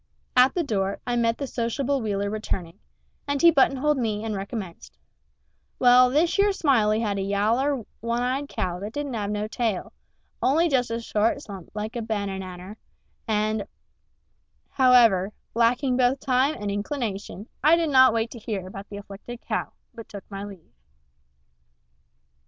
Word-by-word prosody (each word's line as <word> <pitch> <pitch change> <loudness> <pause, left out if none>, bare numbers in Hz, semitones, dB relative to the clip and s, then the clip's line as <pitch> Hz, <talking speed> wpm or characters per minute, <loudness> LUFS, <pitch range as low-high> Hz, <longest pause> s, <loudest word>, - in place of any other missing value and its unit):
At 255 +1 +5
the 350 - +1
door 200 -7 -1
I 245 - -1
met 230 -1 +1
the 280 - -3
sociable 260 +3 -1
Wheeler 200 -2 -1
returning, 190 -6 -4 0.5
and 285 0 0
he 340 +2 +7
buttonholed 275 0 +2
me 215 -3 -1
and 220 - -2
recommenced: 195 -2 -7 0.8
"Well, 250 0 +6
thish 330 +7 +2
yer 405 +1 +5
Smiley 225 - +2
had 205 -3 -1
a - - -1
yaller, 225 +7 +1 0.2
one 235 +2 -1
eyed 270 +3 -1
cow 180 -1 -3
that 205 +3 -6
didn't 290 -2 -4
have 205 -3 -2
no 210 0 -2
tail, 225 -4 -2 0.5
only 325 +6 +3
just 250 -4 +1
a 230 0 -2
short 230 +4 0
stump 195 -5 -9
like 215 +3 -4
a 235 - -2
bannanner, 195 -3 -5 0.5
and 215 -1 0 0.5
" - - -46
However, 230 -7 +5 0.2
lacking 245 +3 +2
both 255 +1 +2
time 265 +3 +1
and 205 -1 -3
inclination, 205 -2 -4 0.2
I 310 +3 +7
did 330 -3 0
not 260 -2 +7
wait 230 0 -1
to 235 - -9
hear 210 -4 -4
about 195 +2 -9
the 200 - -7
afflicted 205 +4 -9
cow, - - -3 0.2
but 230 -2 -11
took 200 -2 -8
my 195 0 -5
leave. 195 - -11
230 Hz, 160 wpm, -25 LUFS, 205-260 Hz, 0.8 s, he